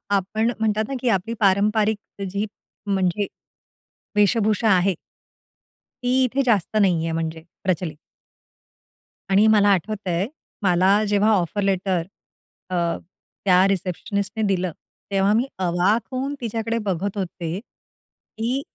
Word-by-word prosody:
आपण 215 +4 0
म्हणतात 215 -1 +1
ना, - - -3
की 250 - +1
आपली 195 +2 0
पारंपरिक 210 +2 +3 0.3
जी 200 +3 -1 0.4
म्हणजे, 195 0 0 0.9
वेशभूषा 215 +1 +3
आहे. 185 -1 +3 1.1
ती 255 +1 +3
इथे 260 +2 +1
जास्त 215 -2 +1
नाही 175 -4 +3
आहे 165 - -1
म्हणजे 160 0 -3 0.2
प्रचलित. 175 -4 -1 1.3
आणि 200 +3 +5
मला 210 -2 +5
आठवत 200 +2 0
आहे, 180 +4 0 0.4
मला 190 +3 +4
जेव्हा 205 +2 +3
ऑफर 195 +1 0
लेटर 190 -2 +1 0.7
अ, - - -5 0.7
त्या 185 0 +5
रिसेप्शनिस्टने 195 +3 -2
दिलं, 185 -2 0 0.4
तेव्हा 195 +1 +3
मी 240 - +2
अवाक 185 +5 +2
होऊन 270 +3 -2
तिच्याकडे 230 0 -2
बघत 195 +2 -2
होते, 175 -2 -3
की 240 +2 -7
200 Hz, 120 wpm, -23 LUFS, 185-220 Hz, 1.3 s, आणि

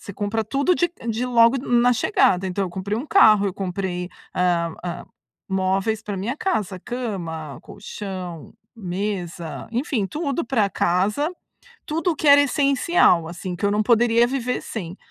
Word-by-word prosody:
você 200 - -9
compra 210 +2 -2
tudo 280 - +1
de 345 0 +1 0.2
de 225 +3 -2
logo 235 0 +5
na 245 +1 +4
chegada. 195 - +2
Então 185 +2 -2
eu - - -4
comprei 190 +3 -3
1 265 - -5
carro, 215 - +6
eu 190 - -3
comprei, 180 -2 -3 0.3
hã 170 -2 +1
hã, 175 -1 -5 0.4
móveis 190 +3 0
pra 210 -1 -5
minha 220 +8 -3
casa, 210 - -2
cama, 170 - -5
colchão, 185 -5 -8 0.2
mesa, 180 -4 -4
enfim, 240 -4 -1
tudo 285 - -2
pra 230 -5 +1
casa, 200 - +1 0.6
tudo 325 +4 0
o - - -8
que 305 - -3
era 285 0 +8
essencial, 275 - +3
assim, 180 +1 -6
que 180 - -5
eu - - +2
não 210 +1 +2
poderia 235 +1 +4
viver 250 -1 -2
sem. 180 -5 -6
210 Hz, 160 wpm, -22 LUFS, 180-250 Hz, 0.6 s, era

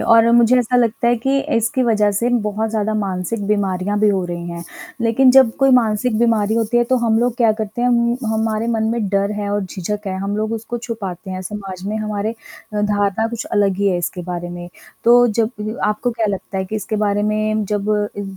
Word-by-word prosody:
और 230 0 +5
मुझे 240 +1 +5
ऐसा 250 0 +1
लगता 235 -1 +1
है 240 - +3
कि 270 +4 0 0.2
इसकी 230 +3 +1
वज़ह 210 -3 +2
से 230 +5 0 0.2
बहुत 215 +1 -2
ज़्यादा 215 -1 -1
मानसिक 200 +1 -2
बीमारियाँ 205 -1 0
भी 215 - +4
हो 190 -3 +1
रही 175 0 -5
हैं, 170 0 -7 0.4
लेकिन 235 +3 +4
जब 265 -2 +6
कोई 270 -1 +3
मानसिक 225 -1 +2
बीमारी 225 -2 +2
होती 230 +1 0
है, 240 - +4
तो 255 +2 +1
हम 225 -1 +3
लोग 240 0 0
क्या 230 -3 +4
करते 215 +3 -4
हैं 245 - +3
उम, 235 0 +2 0.2
हमारे 220 0 -1
मन 225 -2 0
में 225 -4 -1
डर 200 +1 0
है 205 - -3
और 205 0 0
झिझक 200 +3 -5
है 190 0 -2
हम 200 +1 -3
लोग 215 +1 -2
उसको 230 +2 -4
छुपाते 200 -6 -6
हैं 185 0 -5
समाज 190 -2 -7
में 210 +2 -2
हमारे 215 0 -2 0.4
अ, 210 - 0
धारणा 205 +1 +1
कुछ 230 0 -5
अलग 200 -2 +2
ही 200 0 +2
है 180 - +1
इसके 175 +1 -4
बारे 175 0 -5
में। 175 0 -7 0.4
तो 245 +1 +6
जब 220 -1 -3
आपको 210 +4 0
क्या 230 -1 -1
लगता 195 0 -4
है 190 - -1
कि 215 +3 -4
इसके 215 +1 -3
बारे 205 0 0
में 215 0 0
जब 205 +1 -2 0.3
इ 205 - -3
215 Hz, 220 wpm, -19 LUFS, 200-230 Hz, 0.4 s, जब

